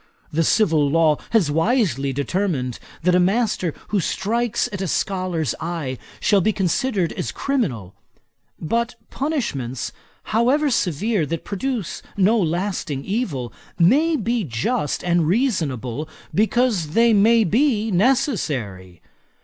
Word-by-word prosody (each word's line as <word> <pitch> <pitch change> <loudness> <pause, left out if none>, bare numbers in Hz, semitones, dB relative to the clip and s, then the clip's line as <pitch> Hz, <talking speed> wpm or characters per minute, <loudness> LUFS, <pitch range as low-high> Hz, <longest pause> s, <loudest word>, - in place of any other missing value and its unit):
The 165 +2 +2
civil 160 -6 +3
law 155 -1 +3
has 195 -10 +2
wisely 160 - +1
determined, 140 - -2 0.2
that 180 +1 +3
a 180 - +5
master 190 -2 +1 0.2
who 205 - +1
strikes 220 +6 0
at 200 - -4
a 190 - -1
scholar's 180 - -1
eye 160 -6 -4 0.2
shall 205 -2 +3
be 215 - +2
considered 195 0 0
as - - -3
criminal. 135 - -2 0.7
But 235 +9 -1 0.2
punishments, 145 - -2 0.3
however 265 +7 +2
severe, 195 - 0
that 165 +1 -4
produce 210 - -3 0.2
no 210 +4 +4
lasting 170 -5 -2
evil, 165 - -2 0.2
may 285 - +4
be 235 -3 0
just 145 - -2
and 175 -2 +2
reasonable, 155 - -1 0.2
because 215 -7 +1
they 230 0 +5
may 225 +3 +5
be 220 - +1
necessary. 150 - 0
185 Hz, 120 wpm, -22 LUFS, 150-230 Hz, 0.7 s, a